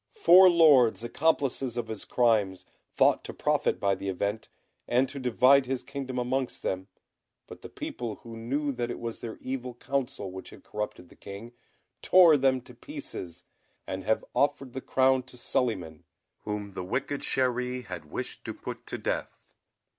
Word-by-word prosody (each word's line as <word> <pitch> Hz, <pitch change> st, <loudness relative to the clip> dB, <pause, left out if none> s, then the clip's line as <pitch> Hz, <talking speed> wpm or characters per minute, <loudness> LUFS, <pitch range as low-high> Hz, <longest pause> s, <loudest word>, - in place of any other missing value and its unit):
Four 185 Hz, -, +8 dB
lords, 145 Hz, -10 st, +5 dB
accomplices 135 Hz, -2 st, 0 dB
of 120 Hz, -2 st, -2 dB
his 110 Hz, -2 st, -5 dB
crimes, 105 Hz, -6 st, +1 dB, 0.3 s
thought -, -, +4 dB
to -, -, -7 dB
profit -, -, +1 dB
by 100 Hz, -1 st, +2 dB
the 100 Hz, -, -4 dB
event, 100 Hz, +3 st, -2 dB, 0.4 s
and 125 Hz, +2 st, +3 dB
to 140 Hz, -, -6 dB
divide 130 Hz, +2 st, +4 dB
his 130 Hz, -1 st, -2 dB
kingdom 135 Hz, -1 st, -5 dB
amongst 125 Hz, +1 st, -2 dB
them; 95 Hz, 0 st, -2 dB, 0.6 s
but -, -, -12 dB
the -, -, -9 dB
people 115 Hz, -3 st, -5 dB
who 115 Hz, -1 st, -11 dB
knew 140 Hz, +6 st, -2 dB
that 120 Hz, -2 st, -3 dB
it -, -, -4 dB
was 115 Hz, -1 st, -5 dB
their 115 Hz, -2 st, -7 dB
evil 125 Hz, -2 st, -4 dB
counsel 125 Hz, -7 st, -3 dB
which 95 Hz, 0 st, -8 dB
had -, -, -14 dB
corrupted 105 Hz, -4 st, -5 dB
the -, -, -17 dB
King, 100 Hz, +4 st, -9 dB, 0.5 s
tore 175 Hz, -4 st, +7 dB
them 130 Hz, -2 st, +2 dB
to 125 Hz, -, -15 dB
pieces, 120 Hz, -, -8 dB, 0.4 s
and 95 Hz, 0 st, -5 dB
have 110 Hz, +3 st, 0 dB
offered 140 Hz, -3 st, 0 dB
the 130 Hz, -, -4 dB
crown 130 Hz, 0 st, +3 dB
to 125 Hz, 0 st, -14 dB
Suliman, 90 Hz, -11 st, -2 dB, 0.4 s
whom 105 Hz, -1 st, -4 dB
the 95 Hz, -, -5 dB
wicked 130 Hz, +8 st, -2 dB
Chéri 125 Hz, -1 st, -1 dB
had 85 Hz, -6 st, -8 dB
wished -, -, -6 dB
to -, -, -5 dB
put -, -, -8 dB
to -, -, -4 dB
death. -, -, -3 dB
125 Hz, 170 wpm, -28 LUFS, 105-135 Hz, 0.6 s, Four